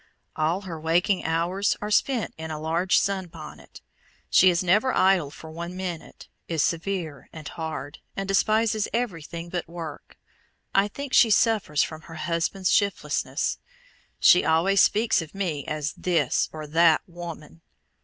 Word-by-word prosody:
All 160 +5 0
her 175 -5 -7
waking 175 +5 +1
hours 170 +5 0
are 210 0 -5
spent 240 +1 +1
in 160 0 -7
a 155 -1 -4
large 165 +4 +1
sun 195 -2 0
bonnet. 160 -2 -12 0.5
She 185 - +7
is 175 0 +1
never 210 +9 +3
idle 185 -6 +3
for 160 +2 -11
one 170 +3 -6
minute, 180 -3 -6 0.2
is 160 -3 0
severe 165 -5 -3
and 155 -2 -9
hard, 155 -3 -6 0.2
and 195 0 -3
despises 215 +2 +2
everything 170 -7 -3
but 175 0 -4
work. 165 -3 -9 0.6
I 195 +1 +4
think 280 +6 -7
she 230 - +6
suffers 210 -9 +3
from 155 -1 -6
her 165 - -9
husband's 170 +4 -1
shiftlessness. 200 -1 0 0.6
She 180 - +6
always 175 +5 +3
speaks 215 -2 +3
of 165 +3 -10
me 165 -8 -2
as 155 -1 -2
"This" 175 -2 0
or 155 -1 -7
"that 160 +1 +4
woman." 170 -2 -9
170 Hz, 150 wpm, -25 LUFS, 160-195 Hz, 0.6 s, She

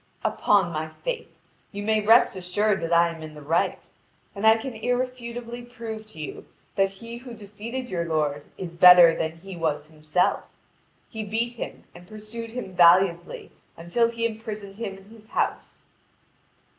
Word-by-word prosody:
"Upon 200 -4 +2
my 155 0 -3
faith, - - -3 0.4
you 205 0 -5
may 215 0 +2
rest 225 +2 +5
assured 190 +2 0
that 165 0 -3
I 170 0 +5
am 165 -1 -8
in 155 -1 -9
the 150 - -10
right, 165 +4 0 0.5
and 205 +2 0
I 220 0 +7
can 250 +3 -6
irrefutably 245 0 -3
prove 230 -3 -8
to 215 -7 -12
you 150 - -7 0.3
that 195 0 +3
he 230 +5 -9
who 245 -1 -10
defeated 220 +5 -7
your 170 -6 -2
lord 150 -3 -1
is 175 -3 -6
better 175 -1 +8
than 160 0 -2
he 185 +3 -10
was 155 -3 -1
himself. 155 +3 0 0.6
He 220 -2 -6
beat 225 +3 -2
him 235 - -7
and 175 0 -14
pursued 215 +2 -8
him 225 -5 -6
valiantly 175 0 +4 0.3
until 200 +8 +1
he 230 0 -2
imprisoned 215 -3 -5
him 200 -4 -5
in 195 - -16
his 220 -1 -16
house." - - -3
205 Hz, 165 wpm, -25 LUFS, 170-230 Hz, 0.6 s, better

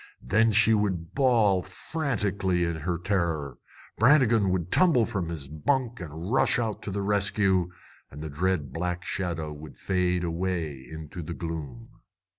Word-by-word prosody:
Then 110 - +3
she 110 +1 +5
would 95 -6 -1
bawl 115 -9 +3
frantically 100 - -1
in 85 -1 -1
her 85 +3 -2
terror. 85 -8 -1 0.4
Brannigan 115 -5 +5
would 90 -2 -1
tumble 160 -11 +4
from 95 -8 -3
his 80 -5 -6
bunk 120 - -1
and 85 - -6
rush 135 - +4
out 115 -3 -2
to - - -5
the 100 +1 -2
rescue. 100 -3 +2 0.4
And 75 +2 -9
the 80 - -5
dread 75 -3 -1
black 90 +2 -3
shadow 80 -5 -3
would 75 +1 -11
fade 90 -2 0
away 85 -5 -3
into 80 +2 -7
the 85 +1 -6
gloom. 75 -8 -7
90 Hz, 150 wpm, -27 LUFS, 80-105 Hz, 0.4 s, she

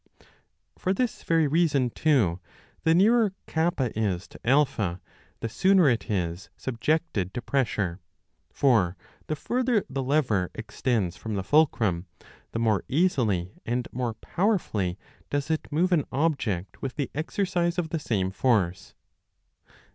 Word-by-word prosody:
For 185 +1 0
this 245 +2 -1
very 165 -2 +2
reason, 145 -5 +2
too, 115 - +2 0.5
the 160 0 +5
nearer 215 +2 +4
K 160 +1 +1 0.3
is 95 -5 -1
to - - -13
A, 125 -8 +2 0.4
the 115 - -1
sooner 185 - +4
it 120 +1 -2
is 90 -3 -2
subjected 125 - -1
to 120 - -2
pressure; 105 -9 0 0.5
for 100 -10 +2 0.3
the 155 - -1
further 240 - 0
the 135 - -3
lever 125 - +1
extends 110 -6 -1
from 110 +4 -4
the 95 - -2
fulcrum, 105 - +2 0.4
the - - -3
more 110 -5 +2
easily 115 - +1
and 120 +1 -2
more 120 -2 -2
powerfully 110 - -1 0.3
does 145 +2 -1
it 155 - -2
move 175 +5 +2
an 165 -5 +3
object 130 - -1
with 135 - -4
the 140 -5 -3
exercise 175 +2 -1
of 170 -3 -1
the 165 - -2
same 95 -9 -1
force. 95 -5 0
130 Hz, 135 wpm, -26 LUFS, 100-160 Hz, 0.5 s, the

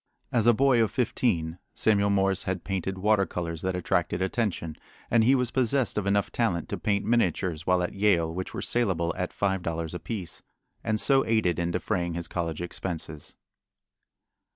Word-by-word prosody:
As 115 -2 +2
a 120 - +7
boy 130 -1 +4
of 110 - +2
fifteen 90 -9 0 0.2
Samuel 100 -2 +3
Morse 95 -1 +1
had 95 -2 -2
painted 95 0 -3
water 100 0 +2
colors 85 -2 -4
that 95 0 -1
attracted 90 -1 0
attention, 95 -5 -1 0.4
and 115 -1 +5
he 130 +4 +5
was 125 -2 0
possessed 130 0 +1
of 105 -2 -1
enough 100 0 +1
talent 90 -9 -1
to - - -3
paint 100 -1 0
miniatures 90 -7 0
while 90 -1 +3
at 90 - -3
Yale 95 -5 +2
which 95 +2 -4
were - - -5
salable 90 -9 0
at - - -3
five 95 -2 0
dollars 85 -1 -3
apiece, 90 -1 -5 0.4
and 110 0 0
so 135 +2 +4
aided 110 -7 +2
in 85 0 0
defraying 85 -1 -1
his 85 0 -4
college 85 -2 -3
expenses. 80 -3 -6
95 Hz, 175 wpm, -27 LUFS, 85-110 Hz, 0.4 s, a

